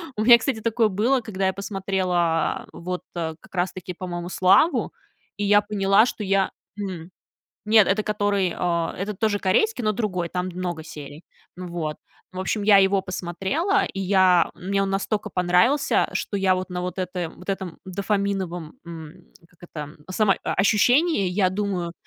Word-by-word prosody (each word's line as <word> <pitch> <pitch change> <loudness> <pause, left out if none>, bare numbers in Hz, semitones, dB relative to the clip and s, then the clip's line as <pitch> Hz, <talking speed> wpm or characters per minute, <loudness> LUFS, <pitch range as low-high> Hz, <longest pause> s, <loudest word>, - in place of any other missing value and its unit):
У 210 - -2
меня, 240 +1 +9
кстати, 225 -1 -2
такое 230 0 +2
было, 220 +7 +1
когда 195 -4 -2
я 190 - 0
посмотрела 185 -4 -1
вот 180 +1 -5
как 160 -2 -6
раз 180 0 -1
таки, 185 -1 -7
по-моему, 175 -1 -6
"Славу". 190 - +3 0.4
И 205 - -2
я 205 +1 +5
поняла, 205 0 +3
что 230 - -4
я 195 -1 +1 0.3
м-м, 180 -4 -5 0.6
нет, 215 -1 +5
это 205 +2 +2
который, 205 -3 0
а, 170 -2 -1
это 200 +3 -3
тоже 205 +1 0
корейский, 245 - +1
но 215 - +2
другой, 190 -5 -2
там 180 +1 -3
много 180 -2 -4
серий. 150 +1 -10 0.3
Ну 180 0 -7
вот. 165 -3 -4 0.4
В 185 - -8
общем, 205 +3 -1
я 205 -1 +6
его 195 0 +3
посмотрела, 190 - -1
и - - -7
я 185 -2 +4
мне 195 +2 -1
он 195 - -1
настолько 200 +2 -2
понравился, 180 +11 +2
что 205 - -2
я 190 -1 +3
вот 185 0 -4
на 180 0 -3
вот 180 +1 -5
этой 180 -2 -3
вот 180 +3 -15
этом 190 -3 -4
дофаминовом, 190 -3 -2
м, 165 +1 -10 0.2
как 175 - -29
это, 150 -1 -7
само 195 +1 +3
а, - - -1
ощущении, 230 - +3
я 185 0 +1
думаю 185 -3 -2
190 Hz, 170 wpm, -23 LUFS, 180-205 Hz, 0.6 s, меня